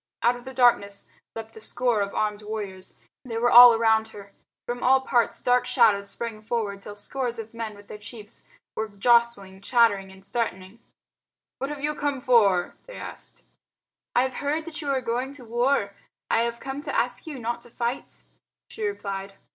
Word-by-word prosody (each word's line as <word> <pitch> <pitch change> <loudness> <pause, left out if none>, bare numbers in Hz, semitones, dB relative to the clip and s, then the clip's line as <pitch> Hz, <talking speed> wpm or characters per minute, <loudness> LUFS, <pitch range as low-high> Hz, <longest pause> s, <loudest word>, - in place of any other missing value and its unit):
Out 240 +1 +4
of 245 +1 -12
the 265 - -7
darkness 200 -5 +3 0.3
leapt 225 0 -8
a - - -10
score 240 -2 0
of 200 0 -3
armed 210 -1 -1
warriors. 205 -3 -6 0.3
They 235 -3 -5
were 240 +1 +2
all 240 -1 +10
round 220 -1 +3
her. 200 -1 -12 0.3
From 245 0 -4
all 265 +1 +5
parts 240 -3 +1
dark 245 0 +3
shadows 205 -5 +3
sprang 225 -1 -6
forward 215 -3 -3
till 205 +1 -9
scores 240 +3 -2
of 225 0 -7
men 225 -2 -5
with 205 0 -16
their 210 - -9
chiefs 215 0 -8 0.3
were 220 0 -2
jostling, 200 -2 +2
chattering 200 -4 +3
and 190 0 -16
threatening. 200 -2 -3 0.8
"What 270 - -2
have 295 -1 -6
you 300 +1 0
come 290 -2 -2
for?" 205 -8 +3
they - - -10
asked. - - -8 0.7
"I 245 - +5
have 260 -1 -3
heard 300 +3 -1
that 330 -1 -6
you 290 - -4
are 270 -2 +1
going 250 +3 -2
to 270 -4 -12
war. 240 -2 +1 0.4
I - - +4
have 235 0 -2
come 270 +2 -5
to - - -4
ask - - -1
you 295 -4 -6
not 235 0 -3
to 240 - -13
fight," 240 +2 -4 0.5
she 445 - -6
replied. 200 - -4
230 Hz, 185 wpm, -25 LUFS, 205-250 Hz, 0.8 s, all